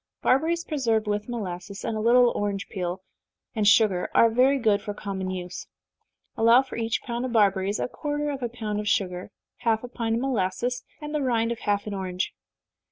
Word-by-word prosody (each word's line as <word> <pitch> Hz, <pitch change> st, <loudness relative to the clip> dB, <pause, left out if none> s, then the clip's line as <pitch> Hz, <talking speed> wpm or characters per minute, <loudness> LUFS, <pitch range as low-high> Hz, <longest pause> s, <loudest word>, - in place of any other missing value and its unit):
Barberries 325 Hz, +6 st, +2 dB
preserved 235 Hz, -9 st, 0 dB
with 210 Hz, +2 st, -2 dB
molasses, 200 Hz, -4 st, -5 dB
and 225 Hz, -, -2 dB
a -, -, -2 dB
little 240 Hz, +2 st, +5 dB
orange 200 Hz, -1 st, -2 dB
peel 185 Hz, -1 st, -4 dB, 0.5 s
and 215 Hz, -3 st, +1 dB
sugar, 205 Hz, -3 st, +4 dB
are 230 Hz, -, +6 dB
very 260 Hz, +4 st, +4 dB
good 215 Hz, -5 st, +2 dB
for 205 Hz, 0 st, -5 dB
common 190 Hz, -2 st, -4 dB
use. 180 Hz, -1 st, -6 dB, 0.7 s
Allow 230 Hz, +3 st, +6 dB
for 265 Hz, -, -9 dB
each 225 Hz, -1 st, -1 dB
pound 240 Hz, 0 st, -3 dB
of 255 Hz, -2 st, -3 dB
barberries 200 Hz, -2 st, +2 dB
a -, -, -1 dB
quarter 295 Hz, +2 st, -3 dB
of 275 Hz, -1 st, -5 dB
a 240 Hz, -, -2 dB
pound 215 Hz, -3 st, -4 dB
of 210 Hz, -, -4 dB
sugar, 180 Hz, -2 st, -1 dB, 0.3 s
half 225 Hz, -2 st, 0 dB
a -, -, -5 dB
pint 230 Hz, -2 st, -2 dB
of 230 Hz, -, -1 dB
molasses, 245 Hz, 0 st, -1 dB, 0.2 s
and 300 Hz, 0 st, -6 dB
the 300 Hz, -, 0 dB
rind 235 Hz, -3 st, +1 dB
of 235 Hz, -, -4 dB
half 205 Hz, 0 st, 0 dB
an 210 Hz, -, -4 dB
orange. 185 Hz, -1 st, -3 dB
225 Hz, 195 wpm, -26 LUFS, 200-245 Hz, 0.7 s, are